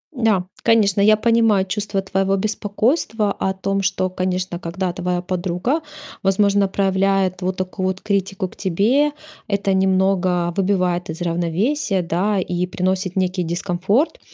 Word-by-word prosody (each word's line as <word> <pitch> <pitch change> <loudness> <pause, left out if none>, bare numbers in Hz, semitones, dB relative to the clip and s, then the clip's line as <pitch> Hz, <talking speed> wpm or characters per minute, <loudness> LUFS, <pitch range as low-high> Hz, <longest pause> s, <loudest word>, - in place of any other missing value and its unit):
Да, 215 -6 +2 0.2
конечно, 210 -4 +3
я 215 +1 +5
понимаю 225 -4 +3
чувство 200 0 -2
твоего 195 0 0
беспокойства 215 - 0
о 190 0 -1
том, 195 +1 -1
что, 185 -1 0
конечно, 185 -1 -2
когда 175 +1 -3
твоя 180 0 -2
подруга, 185 - -1 0.4
возможно, 200 +1 +3
проявляет 190 -1 +1
вот 185 +1 -2
такую 185 0 -2
вот 190 0 -3
критику 195 -2 -1
к - - -17
тебе, 225 - +2 0.4
это 200 -1 0
немного 185 -2 +2
выбивает 185 -3 0
из 160 +2 -6
равновесия, 180 - 0
да, 185 +4 0
и 180 0 -2
приносит 185 +1 -1
некий 185 -1 0
дискомфорт. 185 - 0
190 Hz, 135 wpm, -20 LUFS, 180-200 Hz, 0.4 s, я